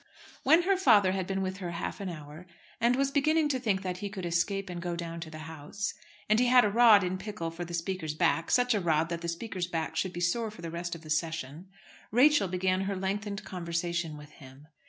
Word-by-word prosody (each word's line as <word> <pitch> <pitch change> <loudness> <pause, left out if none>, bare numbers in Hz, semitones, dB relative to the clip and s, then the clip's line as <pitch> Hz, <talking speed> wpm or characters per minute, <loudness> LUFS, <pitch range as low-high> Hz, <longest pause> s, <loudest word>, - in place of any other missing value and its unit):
When 320 +6 +5
her 390 +1 +2
father 210 - +5
had 190 -1 -2
been 195 0 -1
with 190 0 -3
her 180 -3 -5
half 170 - -4
an 195 - -3
hour, 155 +1 -9 0.3
and 240 +1 +3
was 275 +1 +1
beginning 305 +2 +2
to 260 -3 0
think 205 -6 0
that 180 -1 -3
he 205 - -4
could 195 -3 -6
escape 190 +4 0
and 175 -1 -6
go 175 0 -3
down 170 -1 -5
to 165 -1 -7
the 155 0 -9
House, 160 +6 -5 0.3
and 215 +1 +4
he 250 - +3
had 250 -1 +6
a 205 - +1
rod 225 -3 +7
in 185 +1 -2
pickle 190 -5 -5
for 170 +2 -6
the 170 0 -5
Speaker's 165 -3 -3
back, 165 0 +1
such 245 -1 +3
a 210 - +1
rod 165 -1 +1
that 170 -1 -3
the 170 - -4
Speaker's 180 +1 -3
back 165 -2 -3
should 185 - -1
be 175 - -5
sore 220 +6 0
for 210 -5 -12
the 165 - -5
rest 170 0 -4
of 165 - -10
the 155 - -8
session 160 +1 -2 0.4
Rachel 270 0 +5
began 185 +1 0
her 200 0 -2
lengthened 200 +2 -3
conversation 170 -3 -3
with 150 0 -12
him. 140 +1 -15
185 Hz, 240 wpm, -29 LUFS, 170-210 Hz, 0.4 s, rod